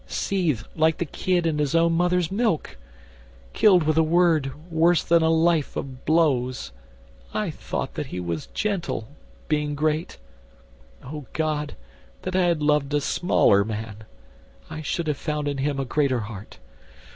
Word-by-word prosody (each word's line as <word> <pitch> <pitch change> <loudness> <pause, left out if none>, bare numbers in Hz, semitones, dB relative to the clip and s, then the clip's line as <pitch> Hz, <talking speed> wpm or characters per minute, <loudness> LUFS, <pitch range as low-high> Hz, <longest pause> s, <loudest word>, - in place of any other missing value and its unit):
Seethed 160 - -1
like 160 0 +2
the 175 - -2
kid 175 +3 -1
in 155 -2 0
its 145 +1 0
own 165 0 +4
mother's 180 0 +1
milk! 200 - 0 0.8
Killed 185 -5 +5
with 155 0 +1
a - - +6
word 160 -4 +3 0.2
worse 165 +1 +3
than 170 0 +4
a 160 - +3
life 165 -2 +2
of 130 -1 -6
blows! 130 - +1 0.6
I - - -1
thought - - -5
that - - -4
he 90 - -5
was 85 -3 -4
gentle, 190 - -2 0.4
being 150 -1 0
great: 155 +3 -1 0.9
O 145 0 -8
God, 150 -2 -2 0.5
that 185 0 -3
I 185 -1 +3
had 170 -3 +1
loved 150 -1 +2
a - - +3
smaller 120 - +3
man! 110 0 -5 0.7
I 155 -1 -5
should 165 +3 -2
have 150 -2 -1
found 150 -1 -3
in 140 -1 -2
him 140 0 -1
a 135 - -1
greater 130 -2 +1
heart. 105 -1 -9
155 Hz, 155 wpm, -24 LUFS, 135-170 Hz, 0.9 s, a